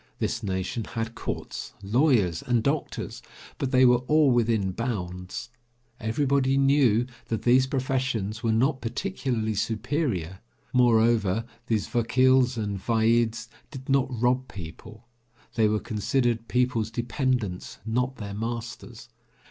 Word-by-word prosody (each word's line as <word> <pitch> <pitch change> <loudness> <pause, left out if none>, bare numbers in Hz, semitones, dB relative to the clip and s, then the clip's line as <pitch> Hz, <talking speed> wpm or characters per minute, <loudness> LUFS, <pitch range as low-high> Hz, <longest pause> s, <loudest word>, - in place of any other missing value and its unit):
This 120 - -2
nation 95 +2 -2
had 115 +1 -4
courts, - - -6
lawyers 105 - +2
and 120 -2 +1
doctors, 140 +3 -2 0.4
but 135 - -1
they 130 0 +5
were 125 -1 +5
all 150 -2 +5
within 115 -5 +2
bounds. 95 -1 -4 0.5
Everybody 135 +4 +1
knew 135 -5 +4 0.2
that 115 - -2
these 130 +2 +4
professions 130 -6 -1
were 115 - +1
not 130 +5 +1
particularly 120 - -2
superior; 110 - -2 0.3
moreover, 115 -4 +3 0.2
these 110 -4 0
vakils 130 +1 +3
and 100 -3 -2
vaids 115 +1 +1 0.2
did 135 -2 -10
not 135 -1 +3
rob 125 +1 0
people; 105 +6 -10 0.5
they 110 -2 +3
were 105 0 +1
considered 115 +1 -1
people's 125 -3 +1
dependents, 120 -4 -2
not 125 +3 -1
their 100 -5 -6
masters. 115 +1 -6
115 Hz, 120 wpm, -26 LUFS, 110-130 Hz, 0.5 s, they